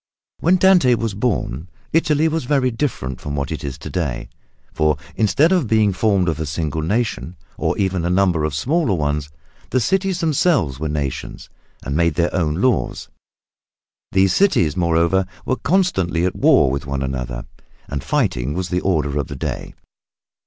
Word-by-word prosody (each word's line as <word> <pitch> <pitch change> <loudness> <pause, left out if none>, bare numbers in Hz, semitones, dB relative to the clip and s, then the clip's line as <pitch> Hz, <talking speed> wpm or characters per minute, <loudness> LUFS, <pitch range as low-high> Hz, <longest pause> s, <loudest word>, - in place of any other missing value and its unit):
When 175 +3 +3
Dante 180 -9 +5
was 115 -2 -2
born 95 - -2 0.2
Italy 155 -1 +3
was 160 -3 -1
very 130 -2 +2
different 115 - -3
from 70 -1 -4
what 70 -2 -3
it - - -4
is 70 -2 -5
to - - -9
day, 75 -10 -3 0.4
for 75 -1 +1 0.2
instead 110 - +3
of 180 -9 +2
being 105 -2 +3
formed 95 -1 +1
of 80 -2 -1
a 80 - -3
single 80 +1 -2
nation, 105 0 -2 0.2
or - - -1
even 95 -2 0
of - - -3
a - - 0
number 90 -5 +2
of 75 -2 -1
smaller 130 - +1
ones, 75 -2 -1 0.4
the 130 - +1
cities 190 - 0
themselves 145 - +1
were 80 0 -2
nations 70 -3 -4 0.3
and 70 - -3
made 85 -1 +2
their 85 +2 0
own 80 -5 0
laws. 125 +7 0 1.0
These 95 0 +3
cities, 90 - +3
moreover, 85 +2 +2 0.2
were 130 - 0
constantly 95 - +1
at 90 - -1
war 65 - +4
with 70 +2 -3
one 70 0 -2
another, 60 -3 -4 0.4
and 70 -1 -4
fighting 60 +5 0
was 90 0 -3
the 90 0 0
order 75 -6 0
of 70 - -2
the 70 - -7
day. 65 - -5
90 Hz, 175 wpm, -20 LUFS, 75-125 Hz, 1.0 s, Dante